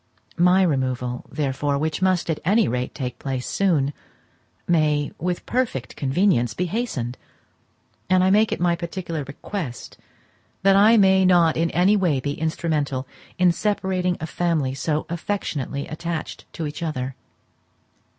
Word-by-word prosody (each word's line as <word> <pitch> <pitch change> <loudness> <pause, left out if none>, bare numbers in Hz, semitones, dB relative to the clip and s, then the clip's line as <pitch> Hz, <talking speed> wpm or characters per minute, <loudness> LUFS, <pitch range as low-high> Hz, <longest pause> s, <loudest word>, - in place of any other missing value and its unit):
My 180 +2 +5
removal, 130 -5 -1
therefore, 140 -1 -1
which 155 +3 -2
must, 185 -2 +2
at 155 - -3
any 210 +6 +3
rate, 125 +2 -2
take 125 -3 -5
place 130 -2 -3
soon, 155 -8 +1 0.7
may, 150 -4 +2
with 180 +1 -2
perfect 240 - -2
convenience, 135 - +1
be 180 - -1
hastened; 165 - -3 0.9
and 185 -1 +4
I 190 - +4
make 215 +2 +4
it - - -2
my 175 0 +2
particular 170 -2 -4
request 140 0 -6 0.6
that 195 0 +5
I 215 +4 +6
may 190 -2 +5
not 175 -3 +4
in 165 +1 +1
any 185 +5 +3
way 175 -9 +2
be 145 +2 -2
instrumental 150 -4 -2 0.3
in 180 -1 +5
separating 185 -2 -1
a - - -3
family 160 -4 0
so 150 +3 -1
affectionately 160 -6 -3
attached 165 +1 -5
to 160 - -4
each 150 +3 -6
other. 135 -5 -3
165 Hz, 140 wpm, -23 LUFS, 140-185 Hz, 0.9 s, I